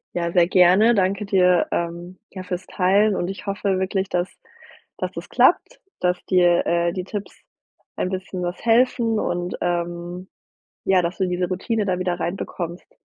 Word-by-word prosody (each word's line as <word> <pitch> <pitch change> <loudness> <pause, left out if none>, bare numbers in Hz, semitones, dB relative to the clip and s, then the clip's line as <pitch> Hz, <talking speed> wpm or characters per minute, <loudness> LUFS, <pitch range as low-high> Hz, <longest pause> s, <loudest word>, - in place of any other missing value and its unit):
Ja, 170 -1 -1
sehr 175 -1 +4
gerne. 190 +6 +5
Danke 195 +1 0
dir, 180 -3 +3
ähm, 170 +2 -4
ja, 190 - -7
fürs 180 0 -5
Teilen 200 +2 +2
und 175 - -2
ich 195 +2 -7
hoffe 200 -1 -1
wirklich, 190 0 -1
dass 175 0 0 0.7
dass - - -3
das - - -8
klappt, - - +3 0.2
dass 180 0 -1
dir, 175 -2 +3
äh, 170 0 +1
die 185 - -3
Tipps 205 0 -6 0.6
ein 185 - -2
bisschen 185 -1 -5
was 175 +5 -5
helfen 230 -1 +3
und, 175 +1 -2
ähm, 175 +1 -3 0.6
ja, 190 -1 +3
dass 170 +1 -3
du 190 - +1
diese 180 0 -1
Routine 210 +3 -1
da 185 -1 0
wieder 180 -1 -2
reinbekommst. 175 -1 -5
185 Hz, 165 wpm, -22 LUFS, 175-195 Hz, 0.7 s, gerne